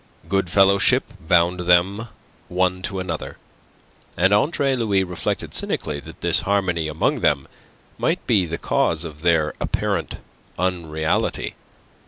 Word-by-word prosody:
Good 95 0 0
fellowship 100 +7 +3
bound 85 +1 +3
them 90 +5 +2 0.4
one 90 0 0
to 95 +1 -4
another; 90 -4 -5 0.8
and 95 - +3
Andre 135 +4 +2
Louis 105 -6 +1
reflected 90 -2 -3
cynically 75 -1 -1
that 70 - -12
this - - +3
harmony 90 -5 0
amongst 75 0 0
them 70 -3 +1 0.5
might - - 0
be 95 -4 +2
the 85 +1 -4
cause 80 -1 0
of 75 -2 -9
their 85 -3 +2
apparent - - -2 0.4
unreality. 80 -4 -1
90 Hz, 125 wpm, -22 LUFS, 80-100 Hz, 0.8 s, fellowship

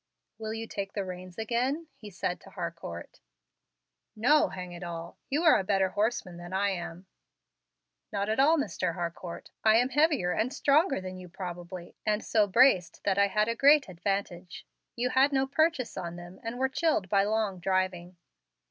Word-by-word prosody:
"Will 220 -1 -4
you 225 0 -4
take 195 -3 -5
the 200 -2 -2
reins 180 -1 -8
again?" 250 +8 -1
he 210 - -11
said 180 -1 -3
to - - -14
Harcourt. 170 - -7 1.0
"No, 270 +8 +4
hang 180 -1 -7
it 175 0 -9
all. 170 -1 -7
You 295 +5 0
are 320 - +6
a - - -1
better 190 0 +2
horseman 205 -3 -1
than 175 +1 -9
I 200 +1 +2
am." 175 0 -6 1.1
"Not 200 -1 -1
at 220 +4 0
all, 310 +4 +5
Mr. 285 - -1
Harcourt. 170 0 -6
I 220 0 +6
am 245 +3 +4
heavier 290 - +2
and 225 +7 0
stronger 295 - +3
than 185 0 -7
you 180 -1 -10
probably, 175 0 -7
and 210 0 0
so 215 -2 +3
braced 195 -5 +4
that 195 0 +1
I 200 - +5
had 210 +2 +1
a 230 - +1
great 285 +3 +5
advantage. 185 -1 -4 0.3
You 250 +1 -1
had 270 +3 +4
no 270 -1 +2
purchase 285 -2 +1
on 175 -2 -5
them, 175 +2 -11
and 230 +2 -5
were 265 +1 +2
chilled 270 - 0
by 195 +1 +3
long 210 -2 0
driving." 185 -1 -1
200 Hz, 180 wpm, -29 LUFS, 180-245 Hz, 1.1 s, are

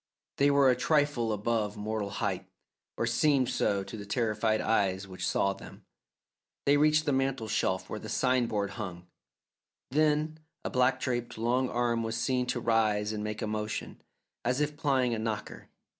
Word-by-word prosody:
They 140 +1 +4
were 140 -2 +5
a - - +2
trifle 145 -7 +1
above 105 0 -1
mortal 105 -1 -2
height, 95 -3 -2 0.5
or - - +1
seemed 130 +2 +2
so 100 -2 +1
to 105 - -8
the 100 - -6
terrified 110 -1 +1
eyes 100 -3 +1
which 95 -1 -4
saw 100 - +2
them. - - -13 0.8
They 140 - +5
reached 155 +1 +4
the 145 - +2
mantel 135 -3 0
shelf 95 -3 0
where - - -5
the - - -8
sign 125 -2 +2
board 100 -3 -1
hung, 90 -3 -6 0.9
then 155 +2 +2 0.3
a - - -2
black 125 0 +3
draped 120 -3 -2
long 125 +3 +1
arm 120 -1 0
was 115 0 -2
seen 125 +1 0
to 125 - -1
rise 110 -2 +1
and 105 -1 -3
make 105 0 -4
a - - -1
motion, 105 0 -4 0.4
as 125 +3 +1
if 150 0 0
plying 135 -5 +1
a 115 - -2
knocker. 110 -1 -4
115 Hz, 175 wpm, -30 LUFS, 105-130 Hz, 0.9 s, were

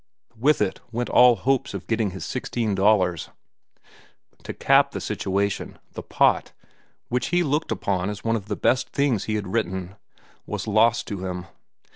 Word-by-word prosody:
With 135 +1 +3
it 95 - -3
went 120 +1 -3
all 125 -1 +7
hopes 130 +5 0
of - - -6
getting 110 -2 0
his 95 0 -7
sixteen 120 -4 -2
dollars. 95 -4 +2 1.1
To - - -6
cap - - +3
the - - -3
situation, 100 +1 -2
"The - - -7
Pot," - - +1 0.6
which 125 +1 -1
he 175 +2 +2
looked 150 +1 -1
upon 95 -1 -1
as 105 -1 -6
one 115 0 +1
of 105 -2 -5
the 105 - -2
best 130 +5 +1
things 135 -8 0
he 110 - -1
had 100 -2 -4
written, 95 -4 -2 0.5
was - - -4
lost 110 +2 +3
to 100 -3 -5
him. 90 0 -5
110 Hz, 165 wpm, -24 LUFS, 95-120 Hz, 1.1 s, all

